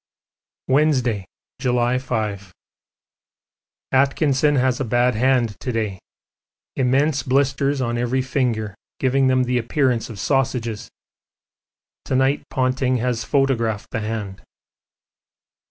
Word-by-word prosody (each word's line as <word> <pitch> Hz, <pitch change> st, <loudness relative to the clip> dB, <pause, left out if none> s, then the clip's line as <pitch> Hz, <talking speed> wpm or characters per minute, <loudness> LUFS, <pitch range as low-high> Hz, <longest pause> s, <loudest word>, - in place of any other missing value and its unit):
Wednesday, 130 Hz, -8 st, +2 dB, 0.3 s
July 125 Hz, -1 st, +1 dB
5. 105 Hz, -6 st, -3 dB, 1.4 s
Atkinson 140 Hz, +1 st, +2 dB
has 130 Hz, -1 st, +1 dB
a -, -, 0 dB
bad 120 Hz, +1 st, +2 dB
hand 120 Hz, -1 st, +1 dB
to 130 Hz, -, -3 dB
day, 110 Hz, -5 st, -2 dB, 0.8 s
immense 135 Hz, +2 st, +2 dB
blisters 135 Hz, +1 st, +1 dB
on 120 Hz, -1 st, -1 dB
every 125 Hz, +2 st, 0 dB
finger 120 Hz, -6 st, -1 dB, 0.2 s
giving 135 Hz, 0 st, +2 dB
them 130 Hz, 0 st, +3 dB
the 125 Hz, 0 st, 0 dB
appearance 125 Hz, 0 st, 0 dB
of 110 Hz, -4 st, -8 dB
sausages. 125 Hz, -4 st, -1 dB, 1.2 s
To 130 Hz, -, -1 dB
night 135 Hz, +2 st, +2 dB
Ponting 130 Hz, 0 st, 0 dB
has 120 Hz, -1 st, -1 dB
photographed 115 Hz, -6 st, 0 dB
the -, -, -2 dB
hand. 105 Hz, -3 st, -5 dB
125 Hz, 105 wpm, -21 LUFS, 115-135 Hz, 1.4 s, them